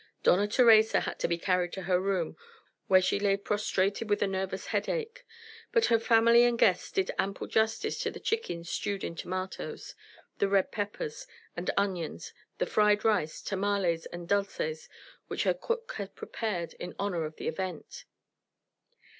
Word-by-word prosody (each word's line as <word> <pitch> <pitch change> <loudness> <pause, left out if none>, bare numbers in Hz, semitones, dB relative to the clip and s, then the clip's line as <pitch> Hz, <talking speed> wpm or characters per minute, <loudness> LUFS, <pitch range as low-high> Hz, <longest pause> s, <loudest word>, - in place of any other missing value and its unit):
Dona 200 +4 +4
Theresa 225 -1 +5
had - - -4
been 170 0 0
carried 180 -1 +1
to 190 - -5
her 180 0 +2
room, 190 -4 -1 0.5
where 185 -1 +5
she 190 - +1
lay 200 -1 +2
prostrated 205 +1 -1
with 205 - +2
a - - +1
nervous 190 0 -3
headache; 480 +1 -2 0.5
but 465 -2 +4
her 230 - +5
family 230 +1 +5
and 240 -1 +3
guests 185 -5 +3
did 190 -1 0
ample 195 0 -1
justice 225 - 0
to - - -1
the - - -8
chickens 175 - -2
stewed 200 +3 -2
in - - -3
tomatoes, 185 +3 -5 0.5
the 200 - +3
red 195 -1 +2
peppers 450 - -4 0.3
and 175 +1 -3
onions, 185 -5 -2 0.2
the - - 0
fried 210 0 +3
rice, 205 -8 +1
tamales, 195 -4 0
and 175 0 -8
dulces 195 -6 -1 0.4
which - - -2
her - - +3
cook 465 -1 -3
had 200 -2 -6
prepared 185 -7 -4
in 180 - -6
honour 185 -5 -1
of 155 0 -6
the - - -6
event. 180 -1 -5
200 Hz, 160 wpm, -29 LUFS, 180-220 Hz, 0.5 s, Theresa